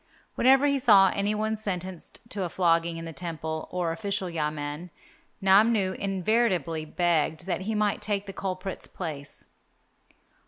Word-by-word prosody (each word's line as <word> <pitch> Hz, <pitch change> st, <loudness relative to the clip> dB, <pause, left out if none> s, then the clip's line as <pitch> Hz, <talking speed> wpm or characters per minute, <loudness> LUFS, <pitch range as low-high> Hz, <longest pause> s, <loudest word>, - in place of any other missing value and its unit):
Whenever 265 Hz, +2 st, +5 dB
he 280 Hz, -1 st, +2 dB
saw 200 Hz, -6 st, +6 dB
any 205 Hz, +1 st, 0 dB
one 215 Hz, +1 st, -1 dB
sentenced 185 Hz, -4 st, -6 dB
to 205 Hz, -3 st, -4 dB
a 180 Hz, -, -1 dB
flogging 170 Hz, -1 st, +1 dB
in 165 Hz, -, -6 dB
the 165 Hz, -, -7 dB
temple 160 Hz, -1 st, -5 dB
or 180 Hz, -2 st, -1 dB
official 195 Hz, 0 st, -2 dB
yamen, 150 Hz, +1 st, -3 dB, 0.5 s
Namnu 195 Hz, 0 st, +4 dB
invariably 190 Hz, -, 0 dB
begged 165 Hz, -1 st, 0 dB
that 190 Hz, -, -2 dB
he 220 Hz, -, 0 dB
might 210 Hz, -1 st, +1 dB
take 205 Hz, -1 st, -2 dB
the 195 Hz, -, -8 dB
culprit's 190 Hz, 0 st, -5 dB
place. 150 Hz, -6 st, -7 dB
185 Hz, 145 wpm, -27 LUFS, 165-205 Hz, 0.5 s, saw